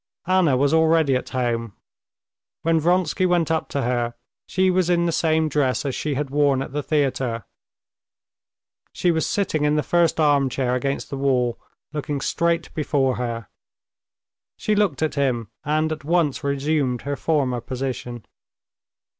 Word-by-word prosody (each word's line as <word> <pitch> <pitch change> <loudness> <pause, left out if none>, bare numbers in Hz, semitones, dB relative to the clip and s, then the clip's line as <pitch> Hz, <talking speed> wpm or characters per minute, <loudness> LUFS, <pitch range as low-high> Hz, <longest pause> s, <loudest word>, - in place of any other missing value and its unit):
Anna 180 -7 +3
was 140 +3 +2
already 160 -3 +4
at 125 - -3
home. 115 -4 -2 0.9
When 165 0 +3
Vronsky 180 +2 +2
went 175 -3 +1
up 160 - -1
to 140 - -2
her, 120 -1 -1 0.3
she 185 0 +2
was 180 -1 +1
in 170 -1 +3
the 170 - +1
same 160 -1 +2
dress 145 -2 0
as 135 - -1
she 150 +1 -2
had 140 0 -3
worn 140 -2 +2
at - - -9
the 145 - -1
theater. 135 -6 -1 1.5
She 175 - +1
was 160 -1 0
sitting 175 -7 0
in 150 0 +2
the 150 - +1
first 170 +2 +2
armchair 135 -4 +2
against 135 +2 -2
the 140 - -3
wall, 125 -4 +1 0.3
looking 145 -1 -3
straight 170 +4 0
before 135 -4 0
her. 115 -3 -4 1.1
She 215 - 0
looked 200 -8 +1
at 155 - 0
him, 125 -6 0
and 155 +2 0
at 155 -2 -4
once 155 -2 +1
resumed 140 -3 0
her 140 0 -2
former 135 -6 0
position. 125 -2 -5
145 Hz, 155 wpm, -23 LUFS, 130-160 Hz, 1.5 s, already